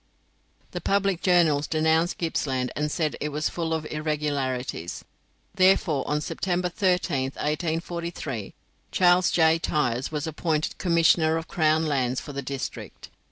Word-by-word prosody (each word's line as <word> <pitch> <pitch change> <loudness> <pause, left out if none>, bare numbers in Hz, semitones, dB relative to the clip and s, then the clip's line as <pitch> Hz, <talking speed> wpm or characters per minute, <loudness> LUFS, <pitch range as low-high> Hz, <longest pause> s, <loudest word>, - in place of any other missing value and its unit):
The - - -5
public 195 -3 +1
journals 165 -5 +3
denounced 160 +2 +1
Gippsland, 130 -6 -1
and 150 0 -1
said 155 -2 -1
it 150 - -1
was 150 +1 -1
full 165 -2 -3
of 160 -1 -1
irregularities. 145 - -3 0.5
Therefore, 185 -7 +3
on 150 +1 0
September 180 +2 -2
13th, 175 -9 0
1843, 160 - -3 0.4
Charles 180 0 +4
J. 160 -1 +4
Tyers 130 -5 -1
was 150 0 -2
appointed 155 -1 -2
Commissioner 165 -2 +3
of 165 - -5
Crown 155 -1 +2
Lands 130 -4 0
for 145 - -9
the 140 - -3
district. 135 0 -6
155 Hz, 130 wpm, -25 LUFS, 145-170 Hz, 0.5 s, Charles